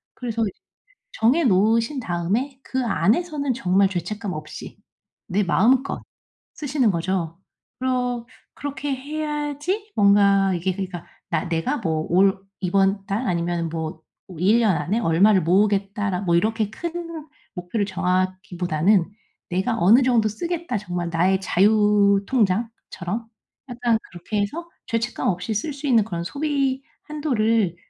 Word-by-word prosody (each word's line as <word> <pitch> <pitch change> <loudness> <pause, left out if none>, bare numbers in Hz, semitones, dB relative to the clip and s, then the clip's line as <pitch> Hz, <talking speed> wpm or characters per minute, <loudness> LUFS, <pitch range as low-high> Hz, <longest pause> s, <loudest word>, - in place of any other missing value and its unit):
그래서 230 -2 -3
이 215 - 0 0.6
정해 255 +10 +3
놓으신 225 +5 +2
다음에 225 +8 -2
그 260 0 -2
안에서는 280 - +1
정말 195 -4 +2
죄책감 200 +2 -4
없이 155 0 -8 0.5
내 205 +3 +1
마음껏 245 +9 +2 0.5
쓰시는 275 -6 +1
거죠. 170 -1 -2 0.4
그러 250 -2 -1 0.3
그렇게 285 0 -4
해야지 300 +7 -3
뭔가 200 -1 +4
이게 180 +2 -1
그러니까 185 -2 -6 0.2
'나 - - -1
내가 175 - 0
뭐 160 -6 -1
올 190 +2 +4 0.2
이번 195 +1 +1
달 220 +5 -1
아니면은 170 -1 -1
뭐 160 -1 -5 0.4
1 205 +6 +4
년 215 -6 +3
안에 205 +9 -1
얼마를 190 0 +4
모으겠다.'라 195 +1 +1
뭐 170 -4 +1
이렇게 215 +4 +1
큰 335 +2 -6 0.3
목표를 180 +4 -2
정하기보다는 185 -1 0 0.4
'내가 190 +6 0
어느 210 +9 +6
정도 235 -4 +3
쓰겠다 335 - -3
정말 175 -4 -4
나의 185 +3 +2
자유 205 0 +3
통장처럼.' 225 -2 -1 0.4
약간 240 -2 +1
그렇게 190 +4 -3
해서 330 +12 -4 0.2
죄책감 230 +1 -2
없이 180 +4 -2
쓸 260 +9 -2
수 285 +1 -6
있는 235 -5 +4
그런 170 -5 -4
소비 280 - -1 0.2
한도를 230 - 0
210 Hz, 280 characters per minute, -23 LUFS, 185-255 Hz, 0.6 s, 어느